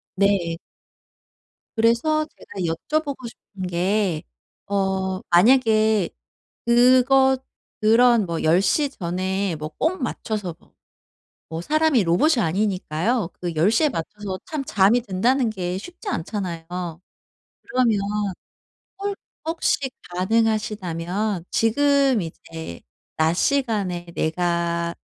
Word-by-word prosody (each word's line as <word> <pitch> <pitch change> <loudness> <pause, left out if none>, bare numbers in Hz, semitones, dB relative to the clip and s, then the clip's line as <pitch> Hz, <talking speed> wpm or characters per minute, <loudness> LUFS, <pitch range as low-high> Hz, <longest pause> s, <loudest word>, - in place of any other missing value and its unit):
네. 190 -4 +1 1.2
그래서 235 +8 +2
제가 - - -17 0.2
여쭤보고 285 - -3
싶은 195 -4 -8
게 180 -1 0 0.5
어 190 -1 0
만약에 220 0 +4 0.6
그거 255 +2 +5 0.5
그런 230 0 +5
뭐 170 -2 -3
10:00 190 - +3
전에 185 - -2
뭐 155 0 -5
꼭 345 0 0
맞춰서 210 -7 -3
뭐 - - -27 0.8
뭐 160 0 -4
사람이 310 - +3
로봇이 235 - +3
아니니까요. 190 +2 0
그 175 -2 -3
10:00 205 - +3
에 - - +5
맞춰서 205 - -5
참 305 -3 -4
잠이 215 +1 +3
든다는 235 +5 +1
게 180 -3 -3
쉽지 355 - -9
않잖아요. 180 - -3 1.0
그러면 250 - +1 1.0
홀 405 0 -2 0.3
혹시 325 +1 +1 0.4
가능하시다면 200 -2 -1
지금 275 0 +3
이제 160 - -8 0.4
낮 160 +1 +2
시간에 205 -8 0
내가 170 0 0
205 Hz, 195 characters per minute, -23 LUFS, 175-250 Hz, 1.2 s, 그거